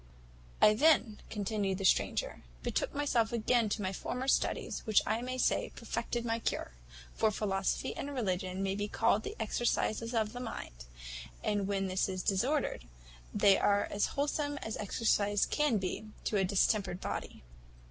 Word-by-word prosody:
"I 210 - +8
then," 240 -4 +3
continued 200 -2 -1
the 195 - -3
stranger, - - +1 0.2
"betook - - -1
myself 250 -6 +1
again 235 -1 +2
to 205 - -2
my 190 0 -1
former 250 +7 -4
studies, - - +1
which 215 - +4
I 220 +2 0
may 255 +1 -3
say - - +1
perfected 240 -1 -3
my 230 0 0
cure; 65 - -2 0.4
for 220 - +2
philosophy 195 +3 -1
and 285 - -4
religion 190 -6 -2
may 195 0 0
be 205 +1 -2
called 210 0 +2
the - - -6
exercises 230 +1 0
of 220 -1 0
the 245 - -6
mind, - - -7 0.6
and 205 -2 0
when 195 -1 0
this 185 +1 0
is 185 -1 -3
disordered, 235 - 0 0.5
they 195 - +5
are 205 0 +3
as 205 - +1
wholesome 290 0 0
as 220 - -3
exercise 205 -1 +1
can 295 -7 +2
be 190 +3 -3 0.2
to - - -1
a 190 - +3
distempered 195 -1 +1
body. - - -5
215 Hz, 160 wpm, -32 LUFS, 195-240 Hz, 0.6 s, I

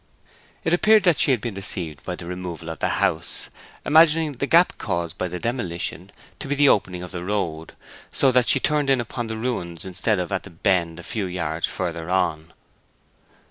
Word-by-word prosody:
It 165 - +1
appeared 215 +3 +5
that 175 -5 +3
she - - +4
had 125 -5 +2
been 115 -1 -4
deceived 90 -6 -3
by 90 - -4
the 85 - -8
removal 90 -2 -6
of 80 - -8
the - - 0
house, - - -1 0.4
imagining 160 0 +5
the 140 +1 -3
gap 170 +4 +4
caused 85 -1 -2
by 90 - -2
the 90 0 -5
demolition 100 -8 -3 0.3
to - - -6
be 145 - 0
the 145 0 +5
opening 90 -3 +1
of 90 - -8
the 90 -2 -5
road, 85 -5 -3 0.4
so 135 - +3
that 125 -1 +3
she - - +4
turned 150 -2 +1
in 135 -1 +4
upon 120 0 -4
the 110 0 -4
ruins 90 -9 -3
instead 95 +3 0
of 90 +2 -3
at 95 - 0
the - - -11
bend 85 -1 0
a - - -9
few 105 -4 -3
yards 85 -3 -2
farther 85 -2 -4
on. 85 -3 0
95 Hz, 200 wpm, -23 LUFS, 85-130 Hz, 0.4 s, appeared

